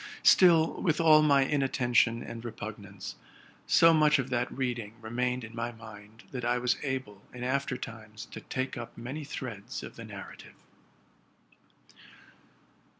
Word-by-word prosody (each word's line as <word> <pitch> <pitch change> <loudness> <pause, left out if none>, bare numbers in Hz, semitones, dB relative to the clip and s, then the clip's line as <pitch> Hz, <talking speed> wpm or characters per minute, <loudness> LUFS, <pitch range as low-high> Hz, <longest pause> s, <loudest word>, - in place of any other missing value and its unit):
Still, 165 -3 +6
with 160 -4 +1
all 155 -2 +7
my 140 -3 +5
inattention 125 -4 +2
and 115 0 -7
repug 115 -1 -6
nance, - - -9 0.5
so 165 0 +6
much 155 -1 +5
of 135 -1 -3
that 125 0 0
reading 120 -5 -3
remained 125 +2 -2
in 115 0 -9
my 120 +1 -2
mind 110 -1 -13
that 125 -3 -5
I 120 +1 +2
was 125 0 +1
able, 130 -8 -4
in 125 0 -8
after 130 0 -1
times, 110 -3 -9
to - - -7
take 130 0 -3
up 120 -1 -8
many 130 +6 -5
threads 120 -7 -6
of - - -9
the - - -8
nar - - -9
rative. - - -15
125 Hz, 150 wpm, -29 LUFS, 115-140 Hz, 0.5 s, all